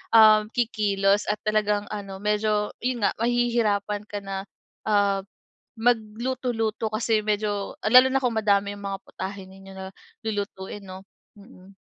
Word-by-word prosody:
um, 215 -1 +7
kikilos 205 -4 +1
at 210 - -1
talagang 210 -1 +1
ano 195 -2 -6
medyo 210 0 +1
yun 245 -2 -2
nga - - +3
mahihirapan 230 -4 +1
ka 205 - -5
na, 195 0 -5 0.4
ah, 200 -2 +3 0.6
magluto-luto 225 -1 0
kasi 220 -1 +1
medyo 205 -1 -1
lalo 255 +4 +7
na 270 - +2
kung 245 - +1
madami 200 -1 +2
yung 200 - -11
mga 195 -1 -3
putahe 190 +1 -6
ninyo 195 0 -13
na 190 0 -7 0.4
lulutuin 205 -2 -4
'no? 185 0 -9 0.4
Mm. 200 -2 -16
210 Hz, 135 wpm, -25 LUFS, 200-225 Hz, 0.6 s, um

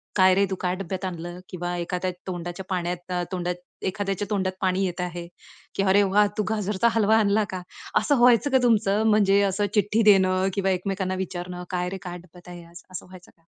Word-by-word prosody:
"काय 185 -1 +6
रे 200 +1 +3
तू 190 - 0
काय 180 0 0
डब्यात 190 0 -5
आणलं?" 175 0 -6
किंवा 175 0 -4
एखाद्या 180 +1 -2 0.2
तोंडाच्या 175 +1 -5
पाण्यात 175 -1 -3 0.2
तोंडात 180 -1 -2 0.3
एखाद्याच्या 195 0 -2
तोंडात 190 -3 0
पाणी 190 +1 +1
येत 180 0 -3
आहे, 175 -1 -5 0.5
की 195 - +1
"अरे 195 +1 +4
वाह! 205 +2 +3
तू 215 - +1
गाजरचा 210 0 0
हलवा 220 0 +4
आणला 215 0 +3
का?" 185 -1 -4 0.4
असं 285 - +1
व्हायचं 245 +3 +5
का 265 - +5
तुमचं 215 -3 +3
म्हणजे 200 -2 +4
असं 205 +2 0
चिट्ठी 210 +2 +2
देणं 190 -2 +4
किंवा 195 -1 +1
एकमेकांना 185 0 -2
विचारणं, 180 0 -7
"काय 180 -1 -2
रे 190 - -5
काय 180 -1 -6
डब्यात 180 0 -17
आहे, 175 -1 -9 0.3
असं 185 - -7
व्हायचं 180 -1 -15
का?" 165 - -33
190 Hz, 190 wpm, -25 LUFS, 180-205 Hz, 0.5 s, काय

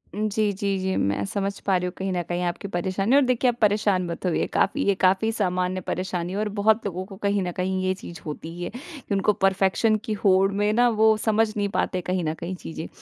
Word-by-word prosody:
जी, 215 0 0
जी, 195 0 -1
जी 190 0 -1
मैं 100 0 0
समझ 200 - -3
पा 195 - +3
रही 180 - -2
हूँ 180 - -3
कहीं 190 0 -2
न 175 - 0
कहीं 175 0 -1
आपकी 175 +3 -3
परेशानी 195 +6 0
और 285 - +7
देखिए 250 0 +2
आप 235 - -11
परेशान 205 -3 +2
मत 170 +2 -5
होइए, 180 - +1
काफ़ी 285 - +1
ये 200 -1 +3
काफ़ी 190 +4 +2
सामान्य 185 -3 -1
परेशानी 180 0 -3
है 200 - -3
और 210 0 -1
बहुत 215 +2 +3
लोगों 185 -1 -3
को 195 - -11
कहीं 200 -1 0
न 180 - -2
कहीं 185 +1 -1
ये 185 0 +1
चीज़ 175 -3 -10
होती 155 +1 -6
ही 175 - -6
है, - - -3
कि 270 - -8
उनको 195 +2 +2
परफेक्शन 195 +3 +2
की 215 - -1
होड़ 195 -1 +3
में 205 +1 +1
ना 245 +2 +4
वो 220 0 +4
समझ 220 +1 +2
नहीं 205 -1 0
पाते 185 -1 -1
कहीं 180 0 -1
न 155 0 -1
कहीं 170 +3 -5
चीज़ें। 165 -2 -7
195 Hz, 240 wpm, -24 LUFS, 180-210 Hz, -, और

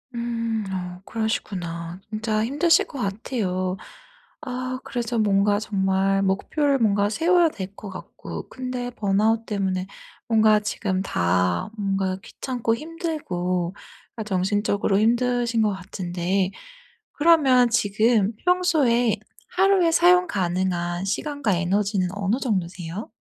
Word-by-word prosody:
음 230 -2 -2
어 180 -1 -5
그러시구나. 180 -6 -3
진짜 215 0 -1
힘드실 300 +7 +3
것 280 - -8
같아요. 195 -3 -2 0.6
아 255 -2 -4
그래서 240 -1 -2
뭔가 205 0 +3
정말 195 -2 +1
목표를 275 +9 +1
뭔가 205 -2 +2
세워야 340 +5 +3
될 195 -6 -7
것 205 - -9
같고 190 - -8
근데 255 -1 -4
번아웃 220 +1 +1
때문에 190 -3 -2 0.4
뭔가 220 -2 +5
지금 200 -2 -2
다 90 - 0
뭔가 195 -2 -1
귀찮고 235 -1 -2
힘들고 200 - -3 0.4
아 220 - -3
정신적으로 205 0 +1
힘드신 240 0 +2
것 210 - +2
같은데 185 0 -2 0.6
그러면 280 -6 +5
지금 220 0 +2
평소에 300 - +3 0.4
하루에 380 -2 +4
사용 360 +1 +5
가능한 180 - -1
시간과 230 - -1
에너지는 190 +1 0
어느 205 +4 0
정도세요? 185 -3 -3
210 Hz, 255 characters per minute, -24 LUFS, 190-245 Hz, 0.6 s, 뭔가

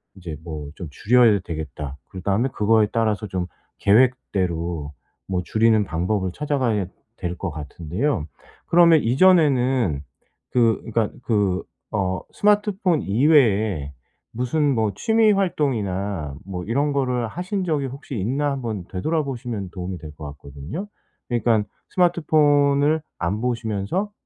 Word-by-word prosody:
이제 90 -5 -7
뭐 75 -4 -6
좀 90 - -7
줄여야 115 - +4
되겠다.' 75 -3 -6
그다음에 100 +7 0
그거에 110 0 +3
따라서 110 -2 0
좀 90 -2 -3 0.3
계획대로 90 - +1 0.4
뭐 90 - +1
줄이는 110 +1 +3
방법을 95 +2 -1
찾아가야 130 -8 0 0.3
될 90 0 -4
것 95 - -3
같은데요. 80 - -2 0.4
그러면 170 -2 +6
이전에는 130 - +3 0.5
그 115 -3 +3
그러니까 115 -1 0
그 100 -5 +1 0.3
어 95 -2 0
스마트폰 205 -5 +2
이외에 110 - +3 0.4
무슨 140 +4 +1
뭐 110 -2 +1
취미 220 - +3
활동이나 100 - -1
뭐 90 -2 -5
이런 140 +7 +1
거를 125 -4 0
하신 185 - -3
적이 155 -6 0
혹시 135 +1 -8
있나 135 +9 0
한번 115 -8 -3
되돌아보시면 120 - -2
도움이 90 0 -5
될 75 -2 -9
것 75 - -8
같거든요. 70 - -7 0.4
그니깐 115 -3 +2 0.3
스마트폰을 150 -4 +3 0.2
안 95 +4 -1
보시면서 120 - -2
115 Hz, 285 characters per minute, -23 LUFS, 95-145 Hz, 0.5 s, 그러면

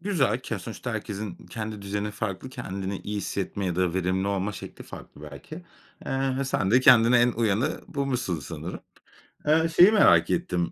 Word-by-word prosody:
Güzel, 165 - +1
ke 110 -4 -4
sonuçta 115 +5 -6
herkesin 105 -3 -6
kendi 110 -2 -6
düzeni 105 +1 -3
farklı, 105 +3 -4
kendini 95 -4 -5
iyi 105 +1 -5
hissetme 100 -1 -3
ya 90 -2 -2
da 90 -2 +1
verimli 95 +1 0
olma 100 +1 -1
şekli - - -9
farklı, 75 - -12
belki. 70 - -10 0.5
Eee, 135 0 -1
ve 140 - 0
sen 105 -7 0
de 125 +4 +5
kendine 120 -2 +6
en 120 0 +3
uyanı 115 +2 0
bulmuşsun 130 - -2
sanırım. 65 - -7 0.7
Iıı, 160 +2 +4
şeyi 180 +5 +7
merak 215 - +5
ettim. 90 - -1
105 Hz, 170 wpm, -26 LUFS, 95-130 Hz, 0.7 s, şeyi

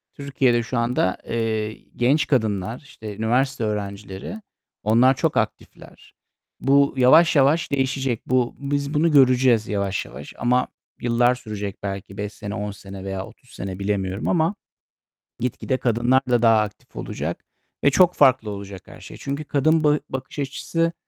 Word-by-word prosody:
Türkiye'de 130 -4 +1
şu 120 +1 -3
anda, 115 -5 +1
eee, 110 -2 -1 0.2
genç 135 +6 +2
kadınlar, 110 -4 0
işte, 110 -8 -9
üniversite 125 +3 0
öğrencileri, 100 - -5 0.4
onlar 120 +5 +5
çok - - 0
aktifler. - - -5 0.5
Bu 140 +1 +4
yavaş 155 +7 +6
yavaş 145 +4 +3
değişecek. 135 -3 -1
Bu 125 -1 +1
biz 140 +1 -2
bunu 160 +3 +2
göreceğiz 130 -5 +4
yavaş 100 -2 -2
yavaş 70 - -10
ama 125 +1 +2 0.3
yıllar 120 +1 +3
sürecek 105 -4 -6
belki 95 -1 -5
5 105 +1 -4
sene, 105 0 -6
10 105 -1 -3
sene 95 -1 -10
veya 95 -1 -4
30 125 - -18
sene 95 0 -6
bilemiyorum 95 0 -2
ama 170 +3 +2 0.9
gitgide 125 +2 -1
kadınlar 120 +2 +2
da 120 -1 +3
daha 115 -2 +5
aktif 105 -1 -6
olacak 80 +5 -5 0.4
ve 140 - +6
çok 180 +4 +4
farklı 130 -6 +4
olacak 100 -2 -8
her - - -13
şey. - - -11
Çünkü 140 +2 -4
kadın 155 +3 +2
bı 150 0 +3
bakış 130 +2 -6
açısı 165 +4 -1
120 Hz, 150 wpm, -23 LUFS, 105-140 Hz, 0.9 s, yavaş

